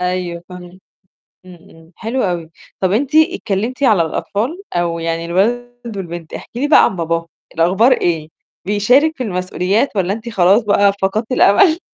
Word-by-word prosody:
أيوه 180 -1 -3
فاهمة. 180 0 -11 0.7
إمم، 185 - -12 0.2
إمم، 165 0 -19
حلو 235 +4 -3
أوي. 175 -4 -2 0.3
طَب 185 -1 0
أنتِ 275 +8 0
اتكلّمتِ 255 - +1
على 215 -9 +4
الأطفال 225 - -3
أو 170 -1 -1
يعني 165 0 -3
الولد 235 +5 -2
والبنت، 170 -3 -7
احكي 240 - -8
لي 290 - 0
بقى 300 - +6
عن 190 - -1
باباهم، 165 0 -2 0.3
الأخبار 190 +10 +3
إيه؟ 165 -8 -1 0.4
بيشارِك 250 +11 +2
في 255 - -3
المسؤوليات 185 +4 -1
والّا 190 0 0
أنتِ 225 +2 -7
خلاص 195 +1 +3
بقى 200 -1 +3
فقدتِ 215 +5 -1
الأمل؟ 315 - +4
195 Hz, 155 wpm, -17 LUFS, 175-240 Hz, 0.7 s, بقى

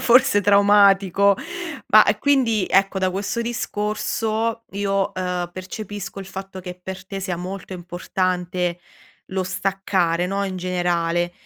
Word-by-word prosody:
forse 250 -2 +5
traumatico, 200 -1 +5 0.6
ma 215 - +10 0.2
quindi 245 -8 +2
ecco, 195 0 +3
da 190 -1 +1
questo 200 +5 -2
discorso 225 0 -2
io, 195 -1 0
uhm, 180 -1 -2
percepisco 195 +1 -7
il 195 - -7
fatto 190 0 -8
che 180 -1 -7
per 190 0 -7
te 195 0 -5
sia 185 -2 -3
molto 185 +2 -6
importante 180 0 -2 0.5
lo 190 0 -2
staccare, 185 -2 0
no, 195 +2 -1
in 190 -1 -4
generale. 175 -1 0
195 Hz, 125 wpm, -22 LUFS, 180-205 Hz, 0.6 s, ma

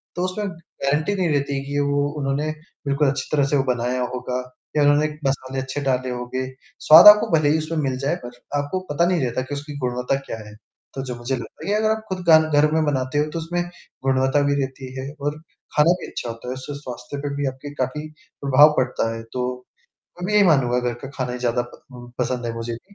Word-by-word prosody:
तो 180 - -1
उसमें 200 +3 -2
गारंटी 160 +1 -2
नहीं 185 -3 +1
रहती 140 -1 0
है - - -2
कि 145 +1 -2
वो 145 0 +1
उन्होंने 140 +2 -1 0.4
बिल्कुल 140 +1 +2
अच्छी 135 - -3
तरह 145 -2 +3
से 145 - +4
वो 135 - +2
बनाया 125 +1 -1
होगा 125 0 -3 0.4
या 150 - +5
उन्होंने 145 +1 +4
एक 150 0 -5
मसाले 135 0 -2
अच्छे 130 +2 -4
डाले 130 -2 0
होंगे। 125 +1 -3 0.4
स्वाद 160 +5 +11
आपको 210 +2 +9
भले 145 -1 +2
ही 155 - +3
उसमें 155 +1 -3
मिल 130 - -3
जाए, 140 +5 0
पर 120 -8 -9 0.3
आपको 145 +6 -2
पता 170 +4 +3
नहीं 175 -3 +1
रहता 125 +1 -1
कि 145 +2 -5
उसकी 145 0 -7
गुणवत्ता 125 0 -1
क्या 110 - -5
है? 105 - -12 0.4
तो 135 - -4
जो 125 - -4
मुझे 120 +2 -2
लगता 115 -3 -8
है - - 0
या 210 - +3
अगर 215 0 +2
आप 220 0 -2
खुद 185 -1 -3
गान 160 -1 +8
घर 150 +1 +4
में 160 0 +2
बनाते 130 -1 -1
हो, 150 - +3
तो 165 - -3
उसमें 175 +2 -2 0.4
गुणवत्ता 135 +1 +2
भी - - +3
रहती 130 -1 -5
है 135 +2 -5
और 145 +2 -2 0.4
खाना 150 +3 +5
भी - - -6
अच्छा 120 - -5
होता 115 +1 -8
है, 125 - -2
उससे 130 +2 -7
स्वास्थ्य 125 0 -7
पे 140 0 -3
भी 145 0 -1
आपके 135 +2 -6
काफ़ी 145 +4 -2 0.3
प्रभाव 145 +2 +6
पड़ता 125 -3 0
है। 115 - -6
तो, 125 0 -3 0.6
मैं 180 - -2
भी 210 - -1
यही 210 - +7
मानूँगा, 130 -7 +3
घर 120 - -2
का - - -5
खाना 125 -1 -2
ज़्यादा 125 0 0
प - - -17
उम, 120 -1 -11
पसंद 125 -1 -1
है 115 - -3
मुझे 115 0 -4
भी। 190 - -14
140 Hz, 235 wpm, -22 LUFS, 125-150 Hz, 0.6 s, स्वाद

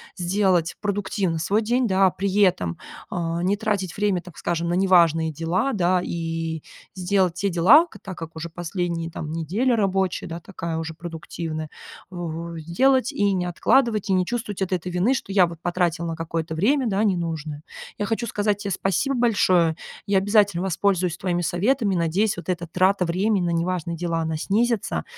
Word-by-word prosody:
сделать 180 -2 +1
продуктивно 200 -4 -1
свой 200 +7 +1
день, 245 +3 +1
да. 190 -2 +4
При 195 0 -2
этом, 90 - +2 0.3
а, 170 -1 -2
не 200 +3 +1
тратить 200 -5 -2
время, 200 -4 +1
так 180 -3 -14
скажем, 170 0 -2
на 175 - +1
неважные 170 -4 +4
дела, 180 - 0
да, 180 -2 +2
и 165 -2 -3 0.3
сделать 185 -1 +1
те 200 +2 -1
дела, 215 - +6
так 190 -2 -8
как 165 -1 -8
уже 165 +1 -4
последние, 170 -1 -3
там, 155 0 -5
неделя 200 - 0
рабочая, 195 -3 0
да, 165 +1 -6
такая 170 -2 -5
уже 160 0 -4
продуктивная, 160 -1 -6 0.4
во 170 -1 -5
сделать 255 - +2
и 205 -7 +1
не 180 - 0
откладывать, 215 +3 +2
и - - +3
не 185 -1 +2
чувствовать 210 -3 -4
вот 190 - -1
этой 180 -1 -2
вины, 185 +9 +2
что 200 -6 -4
я 185 -3 +6
вот 170 -1 -8
потратил 175 -1 0
на 165 -1 -3
какое-то 165 0 -4
время, 250 - +2
да, 205 0 +1
ненужное. 165 -6 -2 0.3
Я 205 - -1
хочу 225 +3 -1
сказать 205 -1 0
те 200 - -4
спасибо 195 - 0
большое, 185 -8 +3 0.3
я 200 -1 +3
обязательно 200 -2 +2
воспользуюсь 185 -1 0
твоими 175 -2 -1
советами, 200 +4 +1
надеюсь, 175 +5 +1
вот 175 - -8
эта 175 -2 -2
трата 185 +3 +2
времени 185 +2 +1
на - - 0
неважные 170 0 -1
дела, 170 -1 -1
она 160 -1 -2
снизится, 225 +6 0
180 Hz, 175 wpm, -23 LUFS, 165-200 Hz, 0.4 s, дела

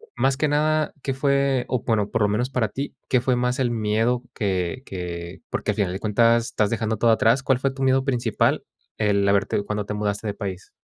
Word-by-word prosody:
más 135 0 +1
que 155 - +1
nada, 155 +1 +1
¿qué 135 - -1
fue? 140 -1 +1
O 125 -3 -1
bueno, 105 -3 +1
por - - -1
lo 105 - +3
menos 120 +5 0
para 125 -5 0
ti, 140 +6 -5
¿qué 130 - +4
fue 125 +1 +1
más 125 +2 0
el 125 - +2
miedo? 115 +2 0
Que 95 +1 -2
que 85 -2 -6
porque - - -1
al - - -4
final 95 -3 0
de 95 - -4
cuentas, 115 +2 +3
estás 105 -3 0
dejando 110 0 -1
todo 115 +2 +4
atrás. 115 +4 +3
¿Cuál 130 -2 +2
fue 135 0 0
tu 135 0 -4
miedo 130 0 +3
principal 120 -5 +1 0.3
el 100 -2 +2
haberte 100 0 +2
cuando 105 0 -3
te 105 - -4
mudaste 105 +1 -2
de 105 - -1
país? 95 -3 -6
115 Hz, 220 wpm, -23 LUFS, 105-130 Hz, 0.3 s, qué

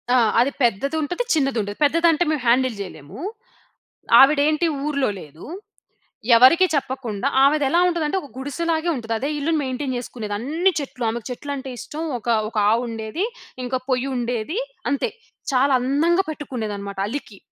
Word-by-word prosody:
ఆ! - - +6 0.2
అది 250 +4 +3
పెద్దదుంటది. 290 - 0
చిన్నది 275 -5 +1
ఉంటది. 205 0 -6
పెద్దది 330 +4 +4
అంటే 325 +2 +2
మేము 305 -3 -1
హ్యాండిల్ 255 0 +3
చేయలేము, 155 - -9 1.0
ఆవిడ 285 +2 +7
ఏంటి 310 +2 +2 0.2
ఊర్లో 280 -5 0
లేదు, 155 0 -12 0.9
ఎవరికీ 295 +10 +7
చెప్పకుండా. 260 -5 -2 0.2
ఆవిదెలా 290 +3 +3
ఉంటుందంటే, 335 0 0
ఒక 285 - -11
గుడిసెలాగే 320 +5 -2
ఉంటుంది. 230 -1 -3
అదే 275 - -2
ఇల్లుని 310 +1 0
మెయింటైన్ 260 0 -3
చేసుకునేది. 220 -4 -5
అన్ని 320 - +1
చెట్లు, 255 -3 -5
ఆమెకు 235 -1 -5
చెట్లంటే 270 +1 -5
ఇష్టం. 260 +7 -6 0.2
ఒక, 230 - -19 0.2
ఒక 230 - -12 0.2
ఆవు 235 - +2
ఉండేది. 225 - -3 0.4
ఇంకా 255 +1 -1
పొయ్యి 255 +1 +1
ఉండేది, 245 - -2 0.3
అంతే. 280 - 0 0.4
చాలా 270 +2 +3
అందంగా 320 +9 +2
పెట్టుకునేది 245 -9 -4
అనమాట, 200 -1 -7
అలికి. 225 -6 -6
265 Hz, 145 wpm, -22 LUFS, 235-305 Hz, 1.0 s, ఆవిడ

